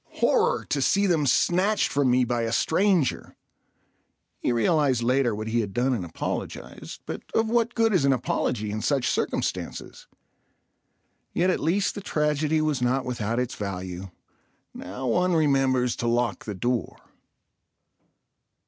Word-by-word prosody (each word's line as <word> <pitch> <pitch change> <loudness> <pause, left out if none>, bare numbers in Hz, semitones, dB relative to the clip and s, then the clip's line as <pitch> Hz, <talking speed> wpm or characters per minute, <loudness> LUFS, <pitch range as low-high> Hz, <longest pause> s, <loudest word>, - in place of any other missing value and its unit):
Horror! 475 +1 +2
to - - -1
see 200 +1 +3
them 160 -6 +2
snatched 185 - +2
from 140 -2 +2
me 125 +1 +4
by 120 0 -1
a 115 -1 -1
stranger. 165 - +1 1.0
He - - 0
realized 125 +1 +2
later 125 -2 +2
what 110 +1 -5
he 120 +1 +1
had 100 -4 -3
done 130 +2 +2
and 110 -7 -2
apologized, 85 - -6
but - - -5
of 225 0 +1
what 235 0 +1
good 225 -2 +2
is 180 - +3
an 140 - +4
apology 120 -4 -1
in 110 +1 -3
such 135 -1 +1
circumstances? - - -3 1.3
Yet 185 +2 +3
at - - -1
least 190 +6 +1
the 205 - -6
tragedy 150 -2 0
was 150 -4 0
not 125 +2 +1
without 115 -2 -2
its 125 0 -2
value. 95 -2 -5 0.6
Now 100 +9 -7
one 180 +9 +2
remembers 135 -5 +2
to 120 - -2
lock 120 0 0
the 105 - -5
door. 120 +5 -2
130 Hz, 150 wpm, -25 LUFS, 115-165 Hz, 1.3 s, me